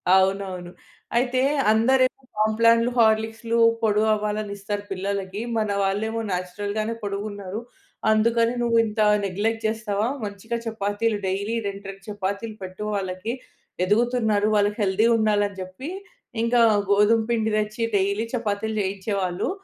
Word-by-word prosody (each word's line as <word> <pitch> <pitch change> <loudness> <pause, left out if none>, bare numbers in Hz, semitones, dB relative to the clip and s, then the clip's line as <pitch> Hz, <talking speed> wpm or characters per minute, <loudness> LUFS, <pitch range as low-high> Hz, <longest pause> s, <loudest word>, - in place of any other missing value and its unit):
అవునవును. 190 -2 0 0.5
అయితే, 255 +1 +2 0.3
"అందరేమో 255 +4 +3 0.2
కాంప్లాన్‌లు, 230 +2 +4
హార్లిక్స్‌లు, 225 +1 +2 0.2
పొడవు 215 0 +2
అవ్వాలని 210 -1 -2
ఇస్తారు 205 +1 -4
పిల్లలకి. 195 +1 -3 0.2
మన 215 -1 0
వాళ్ళేమో 220 +4 -1
నేచురల్‌గానే 205 +5 -2
పొడుగు 200 0 -3
ఉన్నారు. 200 +1 -6 0.5
అందుకని 230 +2 +3
నువ్వు 230 -1 +2
ఇంత 215 +1 -5 0.3
నెగ్లెక్ట్ 220 +4 -1
చేస్తవా, 215 -1 -1 0.2
మంచిగా 210 +3 -4
చపాతీలు 215 0 -1
డైలీ 200 +4 -1
రెండు, 200 0 -6
రెండు 195 0 -16
చపాతీలు 205 +2 -3
పెట్టు 185 +2 -7
వాళ్ళకి. 190 +3 -3 0.5
ఎదుగుతున్నారు. 220 -1 +2
వాళ్ళు 205 0 +3
హెల్తీ 205 +3 +3
ఉండాలని" 205 -2 +1
జెప్పి 185 - -7 0.5
ఇంకా 235 +1 +3 0.3
గోధుమ 210 +3 +5
పిండి 220 -2 +1
దెచ్చి, 215 +2 -2
డైలీ 200 +3 +1
చపాతీలు 220 -1 -2
జెయించేవాళ్ళు. 190 -2 -2
210 Hz, 120 wpm, -24 LUFS, 200-225 Hz, 0.5 s, గోధుమ